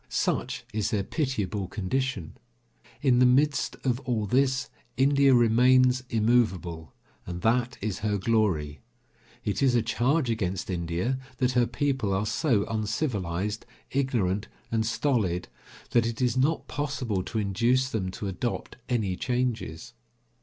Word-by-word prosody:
Such - - -1
is 110 0 0
their 105 -4 0
pitiable 105 - -2
condition. 105 -1 -2 0.7
In 125 -3 +4
the 125 - +6
midst 145 +3 +2
of 125 -2 +1
all 120 -5 -1
this, 130 +3 +1 0.3
India 140 0 +5
remains 125 +2 +5
immovable, 95 - +1 0.4
and 90 0 -6
that 120 +2 +1
is 100 -2 -2
her 105 -1 0
glory. 90 -9 0 0.7
It 105 - -1
is 130 -3 +4
a 120 - +3
charge 130 +6 +1
against 95 -4 -2
India 90 +9 -1 0.2
that 125 0 +2
her 120 -1 +2
people 135 -9 0
are 100 +2 0
so 110 -1 +1
uncivilised, 105 - -2 0.2
ignorant 110 -7 0 0.2
and 110 -1 +1
stolid, 115 - 0 0.4
that 115 -1 +3
it 115 -1 -4
is 125 -2 +1
not 140 +5 +1
possible 130 -8 -2
to 110 - -5
induce 120 +6 +1
them 95 -4 -1
to 100 +2 -5
adopt 100 +7 -4
any 110 -7 0
changes. 120 -9 -2
115 Hz, 135 wpm, -27 LUFS, 100-130 Hz, 0.7 s, the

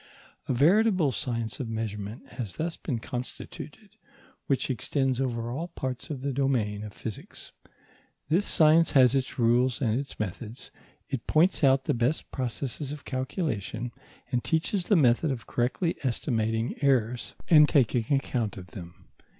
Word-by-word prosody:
A - - +1
veritable 180 - +4
science 115 -1 -3
of 125 -4 -3
measurement 110 -1 -5
has 110 -7 -6
thus 165 +1 -2
been 130 -7 -3
constituted 125 +2 -7 0.5
which 135 0 +1
extends 130 +1 0
over 120 -3 -2
all 160 +7 -3
parts 130 -6 -5
of 140 -4 -4
the 140 -1 -1
domain 120 -7 0
of 105 - -7
physics. 110 0 -8 0.8
This 175 +7 +2
science 160 +1 +5
has 130 -2 +6
its 135 -2 -1
rules 120 +2 +3
and 120 -3 +1
its 140 - -7
methods; 110 +4 -5 0.4
it 135 -5 -4
points 160 +2 +3
out 135 -1 +5
the - - +1
best 120 +6 -1
processes 130 +2 -3
of 150 -1 -8
calculation, 130 - -3 0.4
and 125 -2 0
teaches 175 +3 0
the 205 - +4
method 140 0 +4
of 130 -4 -3
correctly 130 +8 0
estimating 115 -3 0
errors 125 -3 +1
and 150 -3 +7
taking 120 -4 +2
account 120 -6 -2
of 90 -1 -10
them. 85 -3 -11
130 Hz, 150 wpm, -28 LUFS, 115-145 Hz, 0.8 s, and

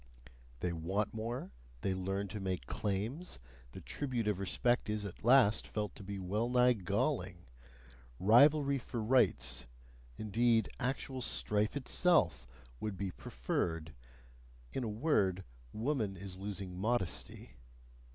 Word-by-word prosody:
They 90 - 0
want 95 +6 -1
more, 115 -1 -4 0.3
they 95 - 0
learn 95 +2 -2
to 105 - -5
make 95 -8 -3
claims, 110 - -3 0.3
the - - -9
tribute 125 -6 -2
of 105 -3 +1
respect 120 +5 +1
is 105 -1 -1
at 100 - -8
last 120 -3 +5
felt 105 -1 -3
to - - -11
be 100 +1 -5
well 105 +5 -1
nigh 125 0 +5
galling; 100 - -1 0.7
rivalry 140 +7 +5
for 120 -1 -5
rights, 110 - +2 0.5
indeed 115 +1 +2
actual 130 0 -2
strife 105 0 0
itself, 125 - +3 0.3
would 105 -3 -3
be 95 -1 -2
preferred: 80 +4 -3 0.8
in 130 - -2
a 115 - -2
word, 105 - +1 0.3
woman 110 -5 -1
is 95 0 -7
losing 95 -2 -5
modesty. 95 - -1
105 Hz, 125 wpm, -34 LUFS, 95-120 Hz, 0.8 s, last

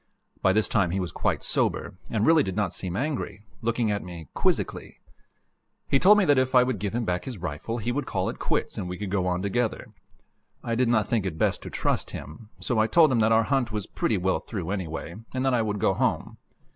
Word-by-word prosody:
By 95 - +4
this 110 +2 +2
time 100 -6 +2
he 95 +3 -1
was 90 -4 -3
quite - - -1
sober, - - 0 0.2
and 110 -2 +1
really 160 -1 +6
did 95 -9 -2
not 105 -3 0
seem 90 -2 -3
angry, 125 -6 -3 0.2
looking 115 -1 0
at 100 - -1
me 85 -3 -9
quizzically. - - -1 0.9
He 135 - +3
told 205 +6 +7
me 205 - +4
that 145 -3 +4
if 130 0 0
I 125 - +8
would 125 -5 -2
give 105 +2 -3
him 120 -1 -1
back 90 -2 -1
his 130 -4 -5
rifle, 90 +6 -4
he 120 +1 -2
would 145 +4 -2
call - - -1
it - - -4
quits - - -1
and 90 - -4
we 90 - -5
could 100 -1 -5
go 95 -2 +1
on 90 +1 -1
together. 115 +2 -1 0.7
I 115 - -2
did 125 +2 +2
not 110 -4 +2
think 110 -5 0
it 80 -4 -5
best - - +1
to - - -7
trust - - -1
him, 80 +9 -11
so 120 -3 0
I 110 - +4
told 155 +4 +5
him 120 - +2
that 110 0 +3
our 110 0 +5
hunt 130 -1 0
was 105 -2 -3
pretty 110 - -1
well 95 +1 +1
through, 95 -4 -5
anyway, 85 -3 -4 0.2
and 130 +1 0
that 135 - +2
I 120 - +3
would 105 -2 -1
go - - +2
home. - - -1
110 Hz, 240 wpm, -26 LUFS, 95-125 Hz, 0.9 s, I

